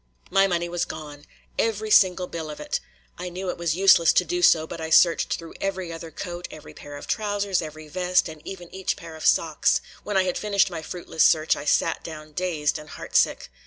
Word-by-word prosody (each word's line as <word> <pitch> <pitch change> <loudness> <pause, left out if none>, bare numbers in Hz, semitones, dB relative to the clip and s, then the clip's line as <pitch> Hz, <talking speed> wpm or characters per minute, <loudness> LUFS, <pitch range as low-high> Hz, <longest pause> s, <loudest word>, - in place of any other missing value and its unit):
My 195 0 +5
money 175 -2 -1
was 175 0 -2
gone! 150 -2 -8 0.3
Every 215 -1 0
single 185 -2 +5
bill 165 -3 -6
of 150 - -8
it. 150 - -2 0.4
I 180 0 -4
knew 180 +1 -4
it - - -9
was 170 -2 0
useless 185 -3 +6
to - - +3
do 355 0 -2
so, 160 - +5
but 160 - -8
I 160 - -4
searched 170 +1 +4
through 165 -1 -10
every 190 -3 -3
other 165 0 -8
coat, 175 +2 -6
every 155 - -11
pair 145 0 -10
of - - -9
trousers, 205 -3 -1
every 155 -1 -8
vest, 180 +3 +1
and 155 -2 -10
even 180 -3 -9
each 190 0 -2
pair 165 -1 -10
of 160 - -9
socks. 160 -2 +3 0.2
When 205 -2 -1
I 190 - +4
had 180 -1 -2
finished 200 -2 +2
my 165 -2 -5
fruitless 160 -1 -1
search, 155 0 +4
I 145 - -7
sat 165 +2 +1
down 155 -1 -9
dazed 160 -3 -1
and 150 0 -12
heartsick. - - 0
170 Hz, 215 wpm, -24 LUFS, 155-190 Hz, 0.4 s, useless